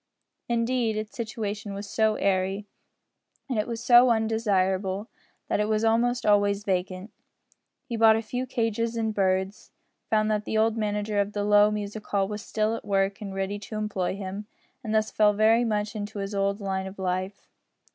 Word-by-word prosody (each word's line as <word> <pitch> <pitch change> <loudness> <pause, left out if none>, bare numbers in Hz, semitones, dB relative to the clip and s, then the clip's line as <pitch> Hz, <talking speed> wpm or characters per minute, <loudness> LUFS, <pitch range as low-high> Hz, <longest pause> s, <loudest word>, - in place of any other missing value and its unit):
Indeed 235 -1 0
its 215 0 -5
situation 210 -3 -4
was 200 +1 -6
so 220 +1 +1
airy, 195 +1 0 0.8
and 250 -6 -1
it 210 - -1
was 235 -1 -5
so 245 0 +7
undesirable, 205 -3 0 0.4
that - - 0
it 210 - +1
was 215 0 +1
almost 235 +2 +2
always 205 -1 +3
vacant. 185 +1 -2 0.7
He 235 - -4
bought 220 -1 +6
a 225 - -1
few 250 +3 -4
cages 230 -2 -1
and 220 -1 -1
birds; 190 0 -1 0.4
found 215 0 +2
that 210 0 -1
the 220 - -1
old 220 0 +3
manager 210 -1 -1
of 200 +1 -3
the 205 - -1
low 205 0 +5
music 210 0 -4
hall 195 -1 +1
was 210 +1 -5
still 215 +1 -1
at - - -7
work 195 0 0
and 195 -2 -6
ready 195 +1 -2
to 210 +2 -8
employ 200 -4 -2
him, 200 +1 -6 0.4
and 220 -1 -2
thus 215 0 +1
fell 210 -1 +4
very 220 +3 +4
much 210 -2 -1
into 210 0 -5
his 200 +1 -4
old 200 +1 0
line 190 -1 -2
of 190 - -10
life. 185 +1 -3
210 Hz, 180 wpm, -26 LUFS, 200-220 Hz, 0.8 s, so